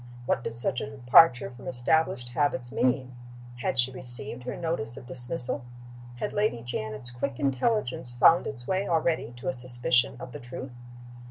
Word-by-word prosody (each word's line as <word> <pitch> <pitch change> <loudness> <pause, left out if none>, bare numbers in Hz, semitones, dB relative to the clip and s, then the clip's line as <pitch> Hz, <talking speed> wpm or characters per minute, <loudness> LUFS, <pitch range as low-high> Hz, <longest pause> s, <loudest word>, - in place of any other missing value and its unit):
What 120 - 0
did 115 - -5
such 120 +1 0
a 140 - -4
departure 125 0 +5
from 125 0 -12
established 125 0 +1
habits 125 -2 0
mean? 130 0 0 0.4
Had 125 - -2
she 125 +1 +4
received 125 0 0
her 125 - -4
notice 150 -8 -3
of 125 - -10
dismissal? 130 +2 -1 0.5
Had 205 - -4
Lady 205 - 0
Janet's 110 0 -4
quick 125 +1 -4
intelligence 135 - -1
found 165 +6 +6
its 120 -4 -6
way 190 +5 0
already 160 -6 0
to 120 - -9
a 130 - +1
suspicion 120 -1 +1
of 125 - -8
the - - -8
truth? 125 +2 -8
125 Hz, 165 wpm, -27 LUFS, 120-140 Hz, 0.5 s, found